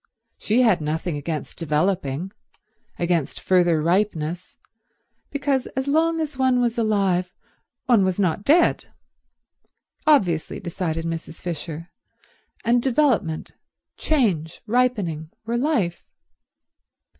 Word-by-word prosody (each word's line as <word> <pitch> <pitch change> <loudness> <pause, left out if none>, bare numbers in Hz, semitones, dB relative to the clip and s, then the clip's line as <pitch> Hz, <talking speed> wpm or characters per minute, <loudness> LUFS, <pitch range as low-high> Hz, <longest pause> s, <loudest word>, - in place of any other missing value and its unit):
She 235 +4 +2
had 215 -9 +3
nothing 155 +2 -2
against 150 0 -5
developing, 165 0 -1 0.7
against 170 -4 0
further 175 -3 +3
ripeness, 175 -2 -1 0.7
because 275 -2 0
as 265 +1 -1
long 325 +3 +2
as 300 -4 -4
one 260 -1 +3
was 240 -1 0
alive 195 -5 +1 0.5
one 235 -6 +4
was 185 0 0
not 185 0 +1
dead—obviously, 280 - -1
decided 170 -3 -3
Mrs. 165 -1 -5
Fisher, 165 0 -6 0.7
and 240 +1 +3
development, 235 - +1 0.4
change, 190 - 0
ripening, 210 -10 0 0.2
were 230 +1 -2
life. 240 - 0
190 Hz, 100 wpm, -23 LUFS, 165-250 Hz, 0.7 s, one